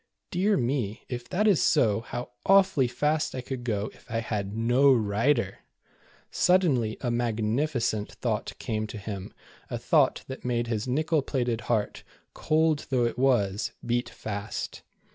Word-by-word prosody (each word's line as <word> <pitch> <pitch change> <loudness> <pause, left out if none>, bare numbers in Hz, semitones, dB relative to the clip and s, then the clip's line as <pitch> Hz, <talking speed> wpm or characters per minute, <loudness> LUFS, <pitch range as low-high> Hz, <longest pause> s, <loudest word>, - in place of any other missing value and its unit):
Dear 195 +3 +2
me, 120 -4 -1
if 120 -1 -5
that 205 +4 +1
is 195 -6 +4
so, 105 -4 +3
how 120 +1 -6
awfully 190 -9 +4
fast 150 +5 0
I 130 - -3
could 130 -1 -6
go 105 -3 -2
if - - -21
I 115 - -1
had 105 -2 -3
no 125 +5 +4
rider 115 -1 +1 0.7
^ - - -16
Sud 185 +1 +4
denly 120 -10 +1
a 120 - -1
magnificent 115 0 0
thought - - -2
came 110 -1 -2
to 105 - -7
him, 100 -2 -6 0.4
a - - -3
thought - - +2
that 130 - -7
made 120 -1 0
his 115 -1 -2
nickel 155 +4 +1
plated 120 -4 -1
heart, 105 -1 0 0.3
cold 155 -1 +1
though 125 -3 +2
it 120 +1 -2
was, 105 -7 +1
beat 120 0 0
fast. 100 -2 -5
120 Hz, 160 wpm, -27 LUFS, 110-140 Hz, 0.7 s, is